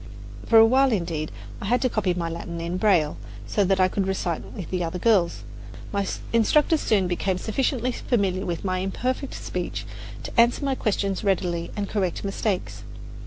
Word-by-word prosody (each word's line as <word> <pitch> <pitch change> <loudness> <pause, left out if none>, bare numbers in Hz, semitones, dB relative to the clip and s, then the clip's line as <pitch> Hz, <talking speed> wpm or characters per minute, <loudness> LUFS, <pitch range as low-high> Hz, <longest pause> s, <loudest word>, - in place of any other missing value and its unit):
For 230 - +6
a 225 - +9
while, 265 +3 +4
indeed, 165 -6 -2 0.3
I - - -4
had 245 +5 +2
to - - +4
copy 195 -6 0
my 170 -1 -2
Latin 170 0 -5
in 170 +2 -3
braille, 180 -7 +3 0.3
so 205 - +1
that 190 +1 +2
I 185 - +5
could 190 +1 -1
recite 180 -4 -1
with 180 -6 -7
the 180 -1 0
other 165 +2 -3
girls. 190 -3 +2 0.5
My 200 -1 0 0.3
instructors 295 +7 +3
soon 200 -4 +2
became 180 +1 0
sufficiently 250 +4 0
familiar 195 -6 0
with 170 +2 -3
my 185 -1 0
imperfect 255 +8 -2
speech - - -4 0.4
to - - -6
answer 240 +4 +2
my 275 - +1
questions 200 -5 -1
readily 175 -3 0
and 205 -1 -2
correct 190 -5 -1
mistakes. 195 -1 -2
195 Hz, 175 wpm, -25 LUFS, 180-225 Hz, 0.5 s, a